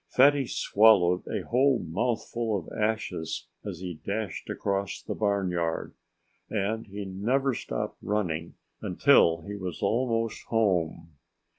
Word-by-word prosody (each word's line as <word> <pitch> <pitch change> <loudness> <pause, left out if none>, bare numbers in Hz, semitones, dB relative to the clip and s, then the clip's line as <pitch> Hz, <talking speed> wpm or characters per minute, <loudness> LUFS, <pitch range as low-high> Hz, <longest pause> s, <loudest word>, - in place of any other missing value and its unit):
Fatty 140 0 +5
swallowed 100 -7 +4
a - - -2
whole 130 +2 +3
mouthful 115 +4 -1
of 85 - -8
ashes 105 -7 -2 0.2
as 95 -4 -6
he 90 -4 -6
dashed 105 0 -4
across 100 -1 -2
the - - -5
barnyard. 90 -5 -1 0.6
And 110 +2 -1
he 100 0 -6
never 125 +9 0
stopped - - -4
running 85 -6 -2 0.3
until 80 0 +4
he 100 - -6
was 95 -1 -5
almost 115 +1 0
home. 85 -8 0
100 Hz, 120 wpm, -28 LUFS, 90-115 Hz, 0.6 s, Fatty